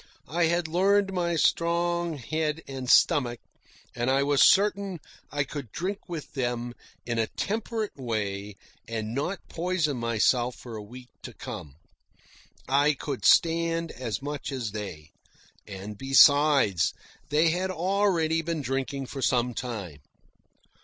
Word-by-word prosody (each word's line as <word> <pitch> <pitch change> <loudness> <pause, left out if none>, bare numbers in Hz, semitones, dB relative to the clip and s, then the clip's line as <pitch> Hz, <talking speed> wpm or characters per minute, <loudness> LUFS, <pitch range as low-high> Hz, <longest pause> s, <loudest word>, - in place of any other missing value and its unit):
I 170 0 +3
had 170 0 +1
learned 195 +4 +2
my 170 -2 0
strong 170 0 +1
head 155 +4 -2
and 130 -2 -5
stomach, 120 -4 +4 0.6
and 120 +1 -1
I 135 +1 +3
was 140 0 +2
certain 200 -2 +4 0.3
I 145 -1 0
could 140 -4 -7
drink 195 +3 -4
with 165 -4 -6
them 120 -2 -2 0.3
in 120 -1 -1
a 110 - +1
temperate 220 +1 -3
way 105 -5 -3 0.3
and 110 -1 -4
not 160 +8 -3
poison 170 -5 -1
myself 120 +1 +1
for 120 -3 -9
a 110 - -6
week 125 +4 -12
to - - -9
come. 70 -3 -8 0.9
I 145 +2 +3
could 135 0 -5
stand 165 0 +3
as 120 -1 -4
much 145 -1 -4
as 125 -6 -3
they; 95 -8 -7 0.6
and 100 +1 -8
besides, 135 - +5 0.3
they 155 +3 +4
had 185 +3 -1
already 180 -3 +1
been 160 -2 -3
drinking 135 +1 -2
for 135 +1 -7
some 125 -1 +1
time. 105 - -5
140 Hz, 135 wpm, -27 LUFS, 120-170 Hz, 0.9 s, besides